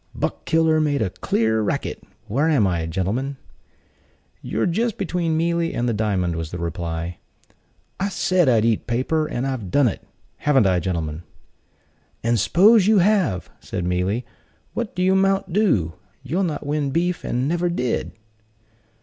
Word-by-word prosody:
"Buck - - -3
killer 160 -1 +3
made 145 -5 +1
a 95 - -2
clear 110 +2 0
racket. 105 - -2 0.2
Where 140 +9 +1
am 135 -10 +3
I, 85 -3 0
gentlemen?" 105 +11 -2 1.0
"You're - - -1
just 220 +6 0
between 170 -4 -1
Mealy 170 0 0
and 120 - 0
the 120 - +1
diamond," 100 -5 0
was 80 -1 -4
the 90 - -6
reply. 85 0 -4 0.8
"I 195 +1 0
said 185 -5 +2
I'd 115 -3 +3
eat 115 -2 +1
paper, 130 +6 0
and 120 -1 -3
I've 130 -8 -3
done 140 +6 +4
it; 105 - -3 0.4
haven't 135 -6 +3
I, 90 -2 +3
gentlemen?" 80 -3 -3 1.0
"And 115 0 +2
'spose 200 - +5
you 215 -1 +5
have!" 185 - +2
said 90 - -4
Mealy, 90 +7 -1 0.5
"what 235 -3 -4
do 180 +1 +1
that 190 - +4
'mount 195 -1 +1
to? 135 - +2 0.3
You'll 170 +8 0
not 150 -5 -3
win 145 -1 -1
beef, 175 +5 -1
and 125 +2 -1
never 175 +2 0
did." 125 -8 -2
135 Hz, 160 wpm, -22 LUFS, -, 1.0 s, spose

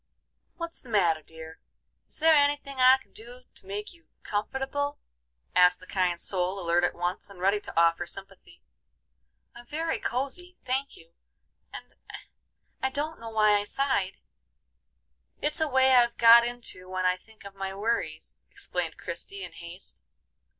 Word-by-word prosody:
"What's 335 -1 -6
the 255 - -15
matter, 170 -7 +3
dear? 160 +1 -12 0.5
Is - - -13
there 320 +1 +5
any 290 -1 +4
thing 275 -2 -10
I 255 +1 +8
can 265 - -23
do 240 +3 -11
to - - -14
make 205 - -5
you 335 -1 -24 0.2
comfortable?" 270 +7 -2 0.6
asked 180 0 +5
the - - -14
kind 180 -3 0
soul, 185 +1 -2
alert 175 -1 +1
at 175 - +1
once, 175 +3 -3
and 195 -2 -13
ready 195 +3 +2
to 205 - -3
offer 170 +1 +3
sympathy. 195 0 -12 0.9
"I'm 240 0 -13
very 320 +4 -2
cosy, 280 +9 -3
thank 265 +2 -2
you, 165 +1 -19 0.6
and - - -10 0.9
I 265 - +1
don't 300 +4 -3
know 230 0 -7
why 215 -1 +4
I - - -3
sighed. 205 -5 -1 1.2
It's 300 +2 0
a 315 - +3
way 265 -1 +4
I've 240 -2 +4
got 235 0 +9
into 235 -6 -5
when 185 0 -2
I 180 0 +3
think 220 +4 -19
of 200 - -9
my 195 0 -5
worries," 225 +4 -3
explained - - -4
Christie, 395 0 -6
in - - -7
haste. 170 - -10
220 Hz, 160 wpm, -28 LUFS, 185-270 Hz, 1.2 s, got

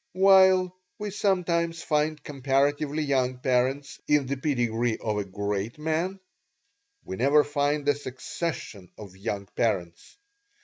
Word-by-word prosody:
While 190 -1 +5 0.2
we 210 -2 -4
sometimes 170 -4 0
find 150 0 0
comparatively 145 +2 0
young 130 -3 0
parents 130 +2 0
in 150 -2 +3
the 140 +2 -2
pedigree 120 -5 0
of 105 -2 -2
a - - -1
great 100 +3 -3
man, 160 +5 -2 0.9
we 95 - -6
never 140 +4 +4
find 145 0 -1
a 145 - +5
succession 130 - -6
of 100 -3 -11
young 100 0 -4
parents. 90 - -2
140 Hz, 125 wpm, -26 LUFS, 120-160 Hz, 0.9 s, While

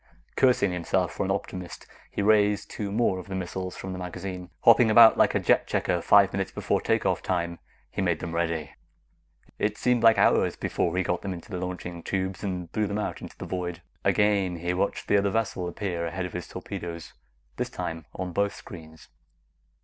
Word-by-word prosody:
Cursing 125 -7 +3
himself 90 -2 0
for - - -2
an - - -3
optimist, 90 -1 -5 0.2
he 100 - -2
raised 105 -1 +3
two 100 -2 -4
more 100 -3 +1
of 90 - -10
the 95 - -5
missiles 95 0 -4
from 95 0 -6
the 90 - -6
magazine. 90 0 -6
Hopping 115 0 +7
about 110 +1 +8
like - - +3
a - - +3
jet - - +2
checker 90 -2 0
five 100 +1 +5
minutes 95 0 -1
before - - -1
take - - +1
off - - +1
time, 85 -2 -2 0.3
he - - -3
made 85 -4 +1
them 85 -1 -5
ready. 85 -2 -1 0.9
It 105 0 0
seemed 125 -1 +2
like 115 -1 +6
hours - - +3
before 85 +1 -1
he 95 - +2
got 90 -1 -1
them 95 -2 -3
into 85 - -12
the 90 0 -3
launching 90 -1 -5
tubes 95 +1 -3
and 90 -4 -4
blew 110 -1 0
them 100 +1 -2
out 105 - -3
into - - -10
the - - -6
void. 90 -2 -4 0.2
Again, 100 -4 +2
he 85 +1 -2
watched 95 +2 -1
the 100 - +4
other 100 0 +2
vessel 100 -4 -1
appear 85 -2 -3
ahead 90 +2 -3
of 90 - -7
his 90 -2 -5
torpedoes, 85 -2 -7 0.4
this - - -2
time 80 -1 -5
on 90 -1 -4
both 100 +3 0
screens. 80 -2 -12
95 Hz, 200 wpm, -27 LUFS, 85-100 Hz, 0.9 s, about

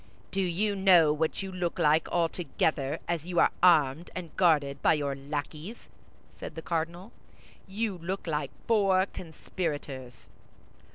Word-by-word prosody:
"Do 195 +2 0
you 195 +3 0
know 180 -6 +5
what 160 +5 -1
you 190 - -5
look 180 -1 -3
like, 160 -2 +3
all 170 -1 +2
together, 155 -4 -1
as 170 -1 -2
you 175 -2 0
are - - +5
armed 160 -3 +4
and 175 -3 -7
guarded 145 -6 +2
by - - +4
your 145 -2 -2
lackeys?" 150 +8 -6 0.4
said - - -9
the 160 - -7
cardinal. 170 +5 -3 0.6
"You 200 -1 -3
look 185 +4 -4
like 150 -4 -2 0.2
four 195 -4 +3
conspirators." 150 -8 -6
170 Hz, 145 wpm, -28 LUFS, 150-185 Hz, 0.6 s, know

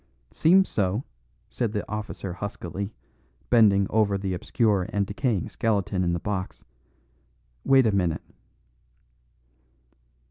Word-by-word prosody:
"Seems 190 +4 +4
so," 100 +4 -1 0.5
said 115 -4 -2
the 105 - -3
officer 105 -3 -5
huskily, 100 0 -5 0.6
bending 105 -5 +5
over 105 -2 +2
the 95 -1 -3
obscure 100 0 0
and 100 -1 0
decaying 105 0 -1
skeleton 100 -4 0
in 85 - +1
the 85 - -1
box. 95 -1 -4 1.0
"Wait 135 -2 +5
a 110 - +3
minute." 90 -5 0
100 Hz, 110 wpm, -26 LUFS, 95-110 Hz, 1.0 s, bending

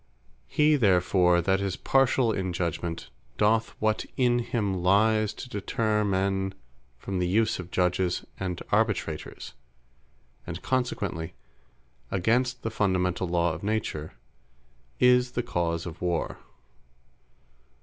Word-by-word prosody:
He 150 - +3
therefore 90 -5 +3
that 95 +2 +2
is 100 -1 -1
partiall 135 -3 +3
in 95 -2 -2
judgment, 85 -1 -3 0.3
doth 110 +2 +2
what 110 0 +1
in 120 -2 +3
him 110 -4 -1
lies, 110 +3 +3
to - - -8
deterre 105 -1 0
men 95 -1 0 0.4
from 95 +9 -4
the 90 - +1
use 110 +3 +1
of 90 -1 -7
Judges, 90 0 0
and 90 -2 -3
Arbitrators; 105 -7 -1 0.9
and 85 0 -5
consequently, 100 -10 -2 0.7
(against 125 +7 +1
the 115 - -2
fundamentall 90 -3 0
Lawe 85 -1 +1
of 80 - -7
Nature) 100 -7 -2 0.9
is 125 0 +4
the 120 - -1
cause 85 -6 -1
of 85 0 -8
Warre. 85 -2 -1
95 Hz, 120 wpm, -27 LUFS, 90-110 Hz, 0.9 s, is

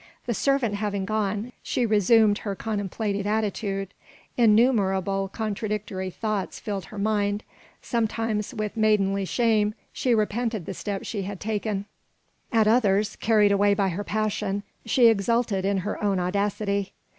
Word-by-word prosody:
The 240 - -1
servant 275 -2 +1
having 205 -1 -2
gone, 215 +2 -1
she 245 - 0
resumed 215 0 +4
her 200 -2 -4
contemplative 205 -1 -2
attitude. 205 -2 -1 0.5
Innumerable 200 -5 +3
contradictory 210 -2 -3
thoughts 210 +1 -3
filled 200 -5 -4
her 215 - -11
mind: 205 0 0 0.4
sometimes 225 -2 -1
with 215 -4 -4
maidenly 200 -3 +2
shame 215 -1 +2 0.2
she 245 -3 +1
repented 220 -2 -1
the 195 - -4
step 200 +1 -4
she 205 - -3
had 195 0 -5
taken; 210 -2 -2 0.7
at 225 -3 +3
others, 210 -3 +3
carried 210 -2 +3
away 200 0 +4
by 195 -1 +1
her 185 +4 -3
passion, 205 -2 -1 0.2
she 240 +2 +4
exulted 225 -2 +2
in 200 0 +1
her 210 - -3
own 200 -2 +2
audacity. 200 +1 -1
210 Hz, 135 wpm, -25 LUFS, 200-220 Hz, 0.7 s, resumed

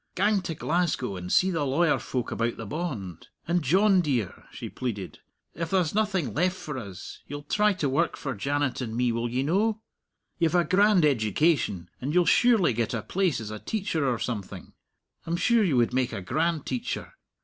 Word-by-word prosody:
Gang 205 +1 +2
to 165 -3 -4
Glasgow 160 - -1
and 90 0 -6
see 190 +1 +4
the 165 -4 0
lawyer 150 +4 +2
folk 125 -3 -3
about 115 0 -1
the 115 - -6
bond. 110 - -5 0.2
And, 175 +1 +2
John 190 +6 +4
dear," 130 - -2
she - - -7
pleaded, 105 -8 -5 0.3
"if 165 +1 -4
there's 180 -4 +1
nothing 195 - 0
left 180 +4 +1
for 150 -6 -6
us, 100 -5 -9
you'll 145 +1 -6
try 210 +7 +2
to 170 -6 -1
work 140 +6 0
for 140 -4 -4
Janet 140 +5 -1
and 115 -3 -4
me, 125 -1 +2
will 115 +1 -1
ye 125 +3 -1
no? 210 +8 +1 0.6
You've 165 0 +2
a 175 - +5
grand 195 -1 +4
education, 110 - +1
and 145 +6 -2
you'll 180 -1 +5
surely 215 - +4
get 115 +1 -1
a 110 - -3
place 185 -4 0
as 110 -2 -6
a 110 - -6
teacher 170 - -1
or 120 - -1
something; 105 -5 -5 0.5
I'm 170 +1 0
sure 230 +4 +3
you 160 -10 +2
would 120 0 +2
make 130 -1 0
a 100 - -4
grand 155 - 0
teacher. 125 -2 -4
150 Hz, 195 wpm, -27 LUFS, 120-180 Hz, 0.6 s, a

